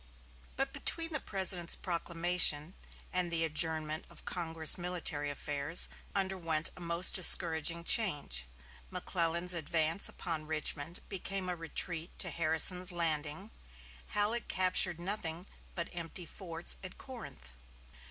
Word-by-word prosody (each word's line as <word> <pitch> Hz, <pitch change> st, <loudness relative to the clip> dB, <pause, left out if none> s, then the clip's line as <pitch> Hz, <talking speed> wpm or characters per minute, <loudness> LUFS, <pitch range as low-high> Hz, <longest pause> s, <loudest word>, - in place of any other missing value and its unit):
But 270 Hz, 0 st, -3 dB
between 330 Hz, +3 st, 0 dB
the 305 Hz, -, -1 dB
President's 185 Hz, -5 st, +1 dB
proclamation 170 Hz, -2 st, 0 dB, 0.4 s
and 180 Hz, -1 st, 0 dB
the 165 Hz, -1 st, 0 dB
adjournment 155 Hz, -1 st, +1 dB
of -, -, -15 dB
Congress 160 Hz, -3 st, 0 dB
military 175 Hz, -5 st, -4 dB
affairs 145 Hz, +3 st, +2 dB, 0.3 s
underwent 180 Hz, -5 st, -2 dB
a -, -, -14 dB
most 170 Hz, +1 st, +4 dB
discouraging 170 Hz, -2 st, +6 dB
change. 145 Hz, -, 0 dB, 0.4 s
McClellan's 170 Hz, -, 0 dB
advance 165 Hz, +2 st, +1 dB
upon 160 Hz, -3 st, -6 dB
Richmond 155 Hz, +1 st, -3 dB
became 195 Hz, -1 st, -4 dB
a 180 Hz, -, -3 dB
retreat 165 Hz, 0 st, -5 dB
to -, -, -1 dB
Harrison's 170 Hz, +3 st, +5 dB
Landing 165 Hz, +3 st, -2 dB, 0.6 s
Halleck 215 Hz, +3 st, -1 dB
captured 185 Hz, -2 st, 0 dB
nothing 175 Hz, -2 st, -4 dB, 0.3 s
but 170 Hz, -1 st, -5 dB
empty 170 Hz, +1 st, -5 dB
forts 170 Hz, -1 st, -1 dB
at 185 Hz, -, -10 dB
Corinth. 225 Hz, -, -11 dB
170 Hz, 115 wpm, -31 LUFS, 160-185 Hz, 0.6 s, discouraging